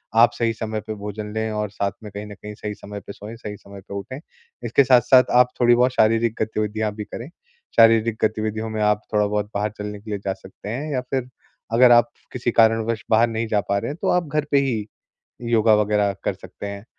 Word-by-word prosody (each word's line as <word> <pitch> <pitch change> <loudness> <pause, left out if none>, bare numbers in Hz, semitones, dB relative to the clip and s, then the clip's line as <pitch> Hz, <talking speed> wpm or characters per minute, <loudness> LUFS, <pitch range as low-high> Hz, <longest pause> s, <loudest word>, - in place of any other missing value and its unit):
आप 115 +1 +6
सही 115 -1 0
समय 110 -1 -4
पर 110 - -3
भोजन 105 +1 -6
लें 110 0 -2
और 105 -1 -2
साथ 100 -1 -2
में 105 - -8
कहीं 105 +1 -6
न 105 - -9
कहीं 105 +1 -9
सही 105 0 -5
समय 100 0 -8
पे 100 - -9
सोएँ, 105 +3 -9
सही 105 -2 -7
समय 100 -1 -13
पर - - -6
उठें। 130 +8 -6 0.4
इसके 140 - +4
साथ-साथ 125 0 +5
आप 125 - +2
थोड़ी 120 0 +6
बहुत 125 +1 +3
शारीरिक 115 +1 +2
गतिविधियाँ 110 0 -1
भी 105 - -5
करें। 120 +6 -8 0.5
शारीरिक 115 -1 +5
गतिविधियों 110 0 -1
में 110 -1 -3
आप 105 0 +2
थोड़ा 105 0 +3
बहुत 105 0 -1
बाहर 105 0 -1
चलने 105 0 -6
के 110 - -12
लिए 100 - -2
जा 95 - 0
सकते 95 +2 -11
हैं 145 +7 -4
या 130 - 0
फिर 125 0 -3 0.5
अगर 125 +1 +6
आप 120 0 +6 0.2
किसी 120 -1 -1
कारणवश 115 0 +2
बाहर 115 +2 +5
नहीं 115 0 -2
जा 105 -2 +1
पा 100 - +2
रहे 115 - -4
हैं 150 - -8
तो - - 0
आप 180 -2 +1
घर 150 +1 -1
पे 140 - +4
ही 115 -6 -1 0.7
योगा 110 -1 +5
वगैरह 105 -1 +1
कर - - 0
सकते 100 - -9
हैं। 100 +1 -7
110 Hz, 225 wpm, -22 LUFS, 105-115 Hz, 0.7 s, आप